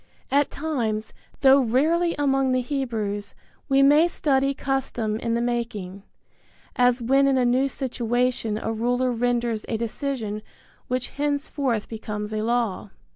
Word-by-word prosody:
At 285 Hz, +1 st, +3 dB
times, 230 Hz, -8 st, -2 dB, 0.3 s
though 275 Hz, 0 st, +7 dB
rarely 320 Hz, +8 st, +2 dB
among 270 Hz, -2 st, +1 dB
the 255 Hz, -, +2 dB
Hebrews, 225 Hz, -7 st, -3 dB, 0.3 s
we 275 Hz, 0 st, +5 dB
may 295 Hz, +4 st, +6 dB
study 275 Hz, -5 st, +1 dB
custom 250 Hz, -6 st, -2 dB
in 230 Hz, 0 st, -1 dB
the 235 Hz, -, 0 dB
making, 230 Hz, -6 st, -3 dB, 0.7 s
as 245 Hz, -1 st, +3 dB
when 270 Hz, +3 st, +4 dB
in 270 Hz, -1 st, +3 dB
a 250 Hz, -, +3 dB
new 255 Hz, +3 st, +3 dB
situation 245 Hz, -4 st, -1 dB
a 225 Hz, +1 st, -3 dB
ruler 245 Hz, +3 st, 0 dB
renders 240 Hz, -2 st, 0 dB
a 225 Hz, -, 0 dB
decision 230 Hz, -2 st, -3 dB, 0.5 s
which 255 Hz, 0 st, -2 dB
henceforth 285 Hz, -5 st, -1 dB
becomes 210 Hz, -1 st, -5 dB
a 215 Hz, -, -1 dB
law. 230 Hz, -3 st, -1 dB
245 Hz, 135 wpm, -24 LUFS, 225-275 Hz, 0.7 s, though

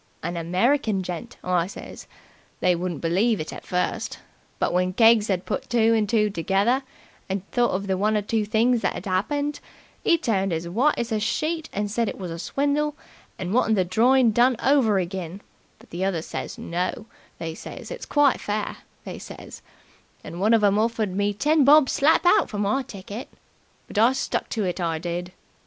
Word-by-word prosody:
An 175 Hz, -, -3 dB
American 190 Hz, -, +1 dB
gent,' 175 Hz, -2 st, -6 dB
I 180 Hz, -1 st, +1 dB
says. 195 Hz, -, -10 dB, 0.5 s
They 180 Hz, -1 st, +3 dB
wouldn't 170 Hz, -4 st, -4 dB
believe 195 Hz, +7 st, +2 dB
it 155 Hz, -, -5 dB
at -, -, -10 dB
first, 180 Hz, 0 st, -2 dB, 0.4 s
but, -, -, 0 dB
when 180 Hz, +1 st, +1 dB
Keggs 225 Hz, 0 st, +5 dB
'ad 185 Hz, -2 st, -1 dB
put -, -, -4 dB
two 230 Hz, -1 st, +3 dB
and 215 Hz, -3 st, +1 dB
two 210 Hz, -2 st, +2 dB
together, 200 Hz, +9 st, +1 dB, 0.5 s
and 190 Hz, 0 st, -3 dB
thought 245 Hz, -1 st, +2 dB
of 195 Hz, +2 st, -2 dB
one 215 Hz, +1 st, +2 dB
or 210 Hz, -, -1 dB
two 220 Hz, +1 st, 0 dB
things 225 Hz, +3 st, +2 dB
that -, -, -1 dB
'ad 175 Hz, -, -7 dB
'appened, 285 Hz, +11 st, -1 dB, 0.4 s
'e 335 Hz, -, +4 dB
turned 195 Hz, -, 0 dB
as 165 Hz, +1 st, -3 dB
white 245 Hz, +12 st, +2 dB
as 235 Hz, 0 st, -3 dB
a 220 Hz, -, +1 dB
sheet 315 Hz, +9 st, -2 dB
and 205 Hz, 0 st, -2 dB
said 230 Hz, 0 st, 0 dB
it -, -, -7 dB
was 180 Hz, -4 st, -6 dB
a 165 Hz, -, -6 dB
swindle 290 Hz, -, 0 dB, 0.4 s
and 185 Hz, +1 st, -4 dB
wanted 225 Hz, -2 st, +3 dB
the 185 Hz, -3 st, +2 dB
drawin' 235 Hz, +6 st, +4 dB
done 245 Hz, +3 st, +4 dB
over 265 Hz, -7 st, +4 dB
again, 185 Hz, 0 st, -4 dB, 0.4 s
but -, -, -20 dB
the 175 Hz, +2 st, -3 dB
others 175 Hz, -4 st, -1 dB
says -, -, -6 dB
'No', 180 Hz, +5 st, -3 dB, 0.3 s
they 165 Hz, -1 st, -5 dB
says, -, -, -9 dB
'it's -, -, -7 dB
quite 290 Hz, -2 st, +3 dB
fair,' 210 Hz, 0 st, -3 dB, 0.3 s
they -, -, -7 dB
says, -, -, -10 dB, 0.6 s
and 175 Hz, -, -7 dB
one 220 Hz, +3 st, +5 dB
of 220 Hz, -, +2 dB
'em 205 Hz, 0 st, +4 dB
offered 220 Hz, -4 st, 0 dB
me 205 Hz, +1 st, +1 dB
ten 295 Hz, +9 st, +2 dB
bob 290 Hz, 0 st, +6 dB
slap 305 Hz, +5 st, +3 dB
out 350 Hz, -, +4 dB
for 210 Hz, -, -5 dB
my 205 Hz, +6 st, +1 dB
ticket. 205 Hz, 0 st, -8 dB, 0.6 s
But 210 Hz, -, -2 dB
I 235 Hz, +4 st, +5 dB
stuck -, -, -2 dB
to 220 Hz, -, -2 dB
it, 180 Hz, -1 st, -2 dB
I 165 Hz, -2 st, 0 dB
did. 175 Hz, +2 st, -4 dB
210 Hz, 190 wpm, -24 LUFS, 185-240 Hz, 0.6 s, bob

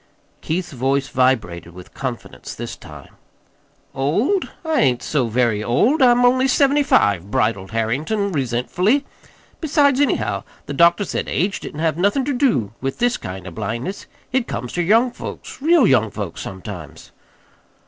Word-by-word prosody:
Keith's 170 Hz, +2 st, -3 dB
voice 135 Hz, +1 st, 0 dB
vibrated 100 Hz, -10 st, 0 dB
with 90 Hz, -1 st, -12 dB
confidence 130 Hz, -4 st, -6 dB
this -, -, -6 dB
time. -, -, -13 dB, 0.8 s
"Old? 205 Hz, -, 0 dB, 0.2 s
I 315 Hz, -5 st, +2 dB
ain't 125 Hz, -, +2 dB
so 135 Hz, -6 st, 0 dB
very 115 Hz, -2 st, +1 dB
old. 225 Hz, -, +2 dB
I'm 245 Hz, -1 st, +5 dB
only 260 Hz, +2 st, +4 dB
seventy 280 Hz, +2 st, +3 dB
five," 100 Hz, -, +2 dB
bridled 105 Hz, -3 st, 0 dB
Harrington 145 Hz, -, -1 dB
resentfully. 170 Hz, -, 0 dB, 0.5 s
"Besides 285 Hz, -3 st, +3 dB
anyhow, 110 Hz, -, 0 dB, 0.2 s
the -, -, -5 dB
doctor 170 Hz, +7 st, +4 dB
said -, -, -3 dB
age 195 Hz, +3 st, 0 dB
didn't 150 Hz, -, -7 dB
have 160 Hz, -1 st, +1 dB
nothin' 205 Hz, +9 st, +1 dB
ter 285 Hz, -, -1 dB
do 225 Hz, -, +1 dB
with 135 Hz, +1 st, -3 dB
this 245 Hz, 0 st, +1 dB
kind 95 Hz, -2 st, -7 dB
of 90 Hz, -, -8 dB
blindness. 115 Hz, -, -4 dB, 0.2 s
It 255 Hz, -1 st, 0 dB
comes 120 Hz, +3 st, -5 dB
ter 175 Hz, -, 0 dB
young 225 Hz, +8 st, +3 dB
folks, 245 Hz, -, -9 dB
real 320 Hz, -2 st, +5 dB
young 115 Hz, -, +3 dB
folks, 100 Hz, -4 st, -6 dB
sometimes." 95 Hz, -4 st, -9 dB
140 Hz, 150 wpm, -20 LUFS, -, 0.8 s, I'm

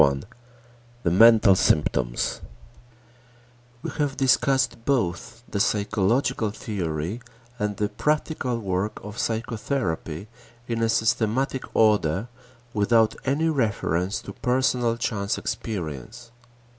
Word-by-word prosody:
X 70 Hz, -1 st, +1 dB, 0.8 s
THE 85 Hz, -, +2 dB
MENTAL 110 Hz, +1 st, +7 dB
SYMPTOMS 65 Hz, -8 st, +1 dB, 1.4 s
We -, -, -3 dB
have 145 Hz, -2 st, 0 dB
discussed 135 Hz, -2 st, +2 dB
both 115 Hz, -2 st, -1 dB
the 100 Hz, -, -3 dB
psychological 105 Hz, +2 st, +1 dB
theory 95 Hz, -, -4 dB, 0.4 s
and 105 Hz, -1 st, -2 dB
the 105 Hz, -, +1 dB
practical 150 Hz, +1 st, -1 dB
work 100 Hz, -1 st, -2 dB
of 105 Hz, +2 st, -8 dB
psychotherapy 110 Hz, -, -2 dB, 0.4 s
in 115 Hz, -1 st, -2 dB
a 115 Hz, -, +2 dB
systematic 115 Hz, +4 st, +1 dB
order 105 Hz, -1 st, +3 dB, 0.4 s
without 110 Hz, +1 st, +3 dB
any 145 Hz, +5 st, +1 dB
reference 100 Hz, -, 0 dB
to -, -, -8 dB
personal 125 Hz, -2 st, +1 dB
chance 100 Hz, -4 st, -1 dB
experience. 90 Hz, -, -5 dB
110 Hz, 100 wpm, -25 LUFS, 95-125 Hz, 1.4 s, MENTAL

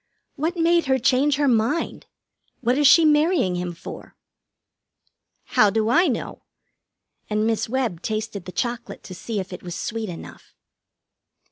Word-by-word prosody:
"What 325 Hz, +5 st, -2 dB
made 340 Hz, 0 st, +3 dB
her 265 Hz, 0 st, +3 dB
change 260 Hz, +4 st, +2 dB
her 290 Hz, 0 st, +1 dB
mind? 240 Hz, +6 st, 0 dB, 0.5 s
What 245 Hz, -1 st, +1 dB
is 290 Hz, 0 st, +4 dB
she 325 Hz, +4 st, +7 dB
marrying 300 Hz, -, +3 dB
him 180 Hz, 0 st, -3 dB
for?" 170 Hz, -, -10 dB, 1.3 s
"How 210 Hz, -, +3 dB
do 220 Hz, +1 st, 0 dB
I 345 Hz, +8 st, +4 dB
know?" 245 Hz, -6 st, -3 dB, 0.9 s
And 215 Hz, 0 st, 0 dB
Miss 225 Hz, -1 st, 0 dB
Webb 235 Hz, -9 st, -1 dB
tasted 215 Hz, -3 st, -4 dB
the 180 Hz, -, -7 dB
chocolate 240 Hz, +3 st, -4 dB
to 185 Hz, -, -9 dB
see 205 Hz, +4 st, -4 dB
if 190 Hz, 0 st, -6 dB
it -, -, -8 dB
was 175 Hz, -1 st, -7 dB
sweet 220 Hz, -2 st, -4 dB
enough. 170 Hz, -, -11 dB
230 Hz, 150 wpm, -23 LUFS, 205-290 Hz, 1.3 s, she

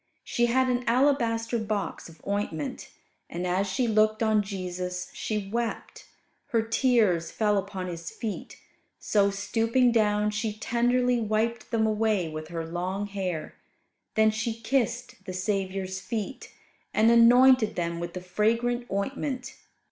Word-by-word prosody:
She 240 Hz, 0 st, +1 dB
had 260 Hz, +2 st, +2 dB
an 250 Hz, 0 st, 0 dB
alabaster 235 Hz, -2 st, +2 dB
box 210 Hz, -5 st, -3 dB
of 165 Hz, -, -17 dB
ointment, 200 Hz, -7 st, -3 dB, 0.4 s
and, 175 Hz, +2 st, -4 dB
as 185 Hz, +3 st, +1 dB
she 240 Hz, +6 st, 0 dB
looked 215 Hz, 0 st, +3 dB
on 220 Hz, -1 st, +3 dB
Jesus, 180 Hz, -2 st, -5 dB
she 210 Hz, -3 st, -3 dB
wept. 230 Hz, +2 st, -4 dB, 0.4 s
Her 230 Hz, -2 st, +1 dB
tears 225 Hz, -8 st, +2 dB
fell 210 Hz, -2 st, +1 dB
upon 195 Hz, -1 st, -3 dB
His 170 Hz, -2 st, -6 dB
feet; 220 Hz, -4 st, -6 dB, 0.4 s
so, 200 Hz, -2 st, +2 dB
stooping 225 Hz, +5 st, +1 dB
down, 210 Hz, -2 st, +2 dB
she 210 Hz, +1 st, -2 dB
tenderly 245 Hz, +1 st, +1 dB
wiped 220 Hz, +2 st, -1 dB
them 225 Hz, -2 st, +1 dB
away 215 Hz, -4 st, +1 dB
with 155 Hz, 0 st, -6 dB
her 165 Hz, -1 st, -4 dB
long 180 Hz, +4 st, -3 dB
hair; 190 Hz, -5 st, -4 dB, 0.6 s
then 220 Hz, 0 st, +5 dB
she 220 Hz, +1 st, -3 dB
kissed 235 Hz, -3 st, -1 dB
the 185 Hz, -, -5 dB
Saviour's 190 Hz, 0 st, -2 dB
feet, 220 Hz, +5 st, -5 dB, 0.4 s
and 220 Hz, +2 st, +5 dB
anointed 240 Hz, 0 st, +6 dB
them 170 Hz, -1 st, -2 dB
with 170 Hz, 0 st, -5 dB
the 180 Hz, -, -4 dB
fragrant 230 Hz, +6 st, 0 dB
ointment. 255 Hz, +6 st, -3 dB
215 Hz, 140 wpm, -27 LUFS, 190-235 Hz, 0.6 s, anointed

